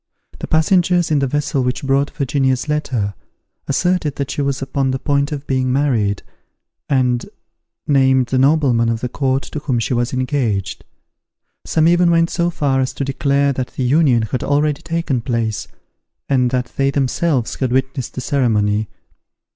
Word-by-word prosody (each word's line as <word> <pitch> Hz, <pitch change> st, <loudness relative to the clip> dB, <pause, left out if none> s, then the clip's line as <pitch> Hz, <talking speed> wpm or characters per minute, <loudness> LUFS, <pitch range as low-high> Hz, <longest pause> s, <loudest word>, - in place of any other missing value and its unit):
The -, -, -5 dB
passengers 175 Hz, +1 st, +2 dB
in 150 Hz, -, +3 dB
the 135 Hz, -, +1 dB
vessel 145 Hz, 0 st, -1 dB
which 125 Hz, +1 st, -2 dB
brought 140 Hz, +1 st, +1 dB
Virginia's 135 Hz, -2 st, 0 dB
letter, 130 Hz, -9 st, -1 dB, 0.5 s
asserted 160 Hz, +1 st, 0 dB
that 140 Hz, -2 st, -3 dB
she -, -, -2 dB
was 140 Hz, -1 st, -1 dB
upon 135 Hz, 0 st, -1 dB
the 130 Hz, -, 0 dB
point 140 Hz, +2 st, 0 dB
of 145 Hz, -1 st, -5 dB
being 130 Hz, -1 st, 0 dB
married, 120 Hz, -8 st, 0 dB, 0.7 s
and 125 Hz, -3 st, +1 dB, 0.6 s
named 130 Hz, -2 st, +3 dB
the 130 Hz, +1 st, 0 dB
nobleman 135 Hz, -5 st, +3 dB
of 115 Hz, 0 st, -2 dB
the 125 Hz, -, -2 dB
court 135 Hz, +1 st, 0 dB
to 150 Hz, -, -6 dB
whom 135 Hz, -4 st, -1 dB
she 115 Hz, +2 st, -1 dB
was 120 Hz, +1 st, 0 dB
engaged. 130 Hz, -7 st, -1 dB, 0.8 s
Some 160 Hz, 0 st, +3 dB
even 175 Hz, 0 st, +4 dB
went 165 Hz, 0 st, +3 dB
so 175 Hz, -1 st, 0 dB
far 140 Hz, -5 st, 0 dB
as 130 Hz, -, -2 dB
to 140 Hz, -, -3 dB
declare 140 Hz, +1 st, +1 dB
that 130 Hz, -1 st, -4 dB
the 130 Hz, -, -2 dB
union 130 Hz, -3 st, +3 dB
had 115 Hz, +3 st, -3 dB
already 145 Hz, 0 st, +1 dB
taken 165 Hz, -6 st, -2 dB
place, 115 Hz, -3 st, -2 dB, 0.6 s
and 125 Hz, -3 st, +2 dB
that 125 Hz, 0 st, -2 dB
they 135 Hz, 0 st, +2 dB
themselves 140 Hz, -1 st, 0 dB
had 130 Hz, -3 st, -2 dB
witnessed 130 Hz, 0 st, -1 dB
the 130 Hz, -, -4 dB
ceremony. 110 Hz, -6 st, +1 dB
135 Hz, 165 wpm, -18 LUFS, 125-145 Hz, 0.8 s, even